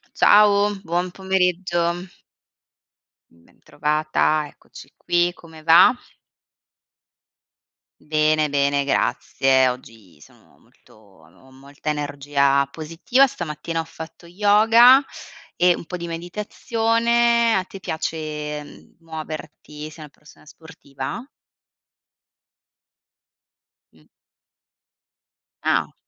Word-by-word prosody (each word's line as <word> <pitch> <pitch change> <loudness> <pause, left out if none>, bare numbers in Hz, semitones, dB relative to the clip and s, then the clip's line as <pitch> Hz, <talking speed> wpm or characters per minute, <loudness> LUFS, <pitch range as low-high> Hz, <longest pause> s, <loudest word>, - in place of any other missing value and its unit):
Ciao. 205 0 +4
Buon 175 +2 -2
pomeriggio. 180 -2 -1 1.2
Bentrovata. 150 - -2
Eccoci - - -16
qui, 175 0 +1
come 160 -3 -15
va? 170 +9 +7 2.1
Bene, 155 0 +1
bene, 140 0 +1
grazie. 130 0 +1
Oggi 110 - -10
sono - - -21
molto - - -26
ho 100 +3 -22
molta 140 +3 -8
energia 140 -1 0
positiva, 165 - +1
stamattina 165 - -5
ho - - -1
fatto 160 +2 -11
yoga, 220 +7 +5 0.5
e 180 0 +4
un - - -9
po' 180 - -7
di 170 0 -6
meditazione. 230 +6 0
A 190 - +1
te 195 +1 -12
piace, 155 -3 -5
mhmm, 145 - -17
muoverti? 155 -2 -9
Sei 155 - -15
una 150 - -12
persona 150 +2 -21
sportiva? 150 - -8 2.7
Mh. - - -24 1.6
Ah. - - 0
160 Hz, 85 wpm, -21 LUFS, 145-185 Hz, 2.7 s, va